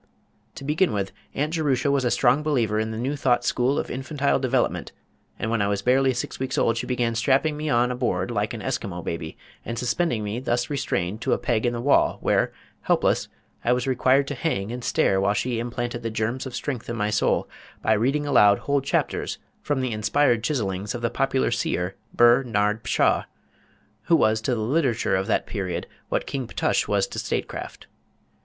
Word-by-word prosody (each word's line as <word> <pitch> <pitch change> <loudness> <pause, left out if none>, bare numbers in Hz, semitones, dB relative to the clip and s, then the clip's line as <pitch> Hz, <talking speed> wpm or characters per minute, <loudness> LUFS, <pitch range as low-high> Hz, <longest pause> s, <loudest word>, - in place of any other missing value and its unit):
To - - -8
begin 155 - +1
with, 100 -2 -2 0.2
Aunt 150 +3 -1
Jerusha 140 -4 +1
was 140 -2 +2
a 125 - +2
strong 125 +4 +3
believer 120 -9 +1
in 110 0 -1
the 110 - -5
New 130 +5 -1
Thought 125 -3 +1
School 130 +3 +1
of - - -2
Infantile 140 +2 0
Development, 130 -1 0 0.5
and 115 - -2
when 115 -2 +1
I 100 - +2
was 100 0 -1
barely 130 +1 +4
six 125 0 -4
weeks 130 0 -2
old 115 0 +2
she - - -3
began 120 -2 0
strapping 135 +6 +2
me 150 +1 -3
on 120 -1 +3
a - - -2
board 125 0 -1
like - - -1
an - - -7
Eskimo 90 -3 -3
baby, 80 -1 -5 0.3
and 115 - -5
suspending 125 0 0
me 105 +3 -3
thus 125 +1 -1
restrained 105 -7 -2
to - - +1
a - - +2
peg 120 0 0
in 120 - 0
the 120 - -3
wall, 140 +3 +3
where, - - +1 0.3
helpless, - - +1 0.4
I 120 - +3
was 125 +1 -1
required 130 +1 +3
to - - -2
hang 120 -8 -2
and 125 0 -5
stare 95 -4 +2
while 100 +1 +2
she 120 +1 -1
implanted 120 0 -3
the 115 - -3
germs 115 +4 -2
of 125 - -7
strength 125 -4 -4
in 115 - -2
my 105 -1 -1
soul 105 - +1 0.4
by 110 - +4
reading 135 +7 +1
aloud 105 -8 +5
whole 140 -1 +2
chapters 135 - -1 0.2
from 145 -3 -1
the 130 -2 -1
inspired 115 +2 +2
chisellings 105 -7 -2
of 120 - -6
the 115 - +1
popular 135 -2 +1
seer 95 -5 -1 0.2
Ber 120 +2 +5
Nard 105 -2 0
Pshaw, - - +2 0.8
who 170 - +4
was 110 -5 +3
to 125 +2 0
the 110 - -2
literature 125 -3 +1
of 95 +2 -1
that - - +1
period 95 -5 -3 0.2
what - - 0
King 135 -4 -4
Ptush - - 0
was - - +2
to - - -6
statecraft. - - -4
120 Hz, 205 wpm, -24 LUFS, 110-135 Hz, 0.8 s, aloud